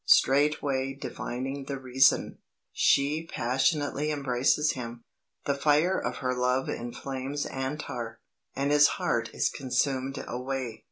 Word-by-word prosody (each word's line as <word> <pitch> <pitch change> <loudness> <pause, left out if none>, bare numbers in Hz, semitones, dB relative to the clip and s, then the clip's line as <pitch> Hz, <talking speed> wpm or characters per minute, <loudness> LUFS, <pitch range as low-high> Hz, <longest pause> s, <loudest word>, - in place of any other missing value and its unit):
Straightway 135 -1 +3
divining 135 +1 -4
the 140 0 -4
reason, 130 0 +2 0.3
she 150 +4 +2
passionately 145 +4 0
embraces 140 +1 +2
him. 120 -2 -7 0.4
The 140 - +2
fire 150 +6 +3
of - - -2
her 125 - +2
love 125 +1 +1
inflames 135 +4 -4
Antar, 130 -4 -4 0.4
and 140 +2 0
his 145 0 +7
heart - - 0
is - - 0
consumed 135 0 -1
away. 125 -2 -4
135 Hz, 115 wpm, -28 LUFS, 125-145 Hz, 0.4 s, his